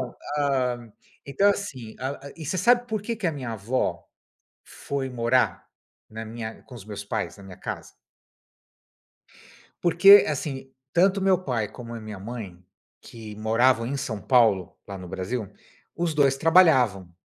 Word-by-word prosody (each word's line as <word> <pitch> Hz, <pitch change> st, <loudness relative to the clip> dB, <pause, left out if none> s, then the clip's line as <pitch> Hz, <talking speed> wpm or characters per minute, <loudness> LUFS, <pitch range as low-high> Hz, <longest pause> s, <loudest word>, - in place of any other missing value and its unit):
então, 125 Hz, -, -8 dB, 0.2 s
hã, 125 Hz, -5 st, -1 dB, 0.3 s
então, 195 Hz, +9 st, +2 dB
assim, 130 Hz, -, -5 dB, 0.4 s
e 160 Hz, -, -8 dB
você 185 Hz, +6 st, -2 dB
sabe 240 Hz, +6 st, +4 dB
por 215 Hz, -1 st, -2 dB
que 230 Hz, +2 st, -3 dB
que 205 Hz, -5 st, -2 dB
a -, -, -2 dB
minha 130 Hz, -5 st, -5 dB
avó 110 Hz, +5 st, -2 dB, 0.6 s
foi 135 Hz, -2 st, -4 dB
morar 125 Hz, +1 st, +1 dB, 0.4 s
na 110 Hz, +1 st, -7 dB
minha 110 Hz, 0 st, -7 dB
com 130 Hz, -, -13 dB
os 115 Hz, -, -10 dB
meus 100 Hz, -1 st, -7 dB
pais, 110 Hz, 0 st, -3 dB
na 100 Hz, -, -13 dB
minha 95 Hz, -1 st, -11 dB
casa? -, -, -6 dB, 1.9 s
Porque 185 Hz, +4 st, +8 dB
assim, 135 Hz, -2 st, -4 dB, 0.2 s
tanto 190 Hz, +3 st, +3 dB
meu 190 Hz, -1 st, +4 dB
pai, 115 Hz, -, -1 dB
como 120 Hz, +1 st, -10 dB
a 115 Hz, -, -6 dB
minha 105 Hz, -3 st, -8 dB
mãe, 100 Hz, -5 st, -8 dB, 0.4 s
que 110 Hz, -3 st, -10 dB
moravam 115 Hz, +2 st, +2 dB
em 140 Hz, +3 st, -3 dB
São 110 Hz, -5 st, -4 dB
Paulo, 110 Hz, -7 st, +3 dB
lá 100 Hz, -, -6 dB
no 90 Hz, -1 st, -9 dB
Brasil, 95 Hz, +4 st, -4 dB, 0.4 s
os 170 Hz, -1 st, -1 dB
2 140 Hz, -2 st, +3 dB
trabalhavam, 130 Hz, -, +4 dB
125 Hz, 155 wpm, -25 LUFS, 110-150 Hz, 1.9 s, Porque